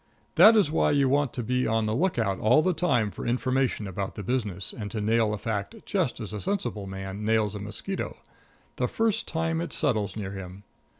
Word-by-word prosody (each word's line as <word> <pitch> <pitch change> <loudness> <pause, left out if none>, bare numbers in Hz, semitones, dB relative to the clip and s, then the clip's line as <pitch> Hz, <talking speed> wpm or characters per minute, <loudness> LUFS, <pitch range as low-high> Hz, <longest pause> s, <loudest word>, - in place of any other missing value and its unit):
That 225 +1 +8
is 200 -9 +4
why 160 - +2
you 140 -2 +3
want 140 0 +2
to 125 - -3
be 125 +3 0
on 110 0 +1
the 110 - 0
lookout 115 - 0
all 125 +8 +4
the 185 - +2
time 125 - +1
for - - -7
information 130 -1 0
about 95 0 -4
the 105 - -6
business, 105 -5 -2
and 105 -2 -6
to 110 - -4
nail 110 +1 +2
a 105 - -2
fact 105 -2 -3
just - - -1
as 100 - -5
a 105 - -4
sensible 120 - -2
man 95 +1 -6
nails 110 -1 +2
a 105 - -5
mosquito 105 - -5 0.6
the - - +1
first 225 -1 0
time 165 0 -1
it 170 - -4
settles 110 - 0
near 100 -3 -4
him. 95 0 -8
110 Hz, 205 wpm, -27 LUFS, 105-145 Hz, 0.6 s, That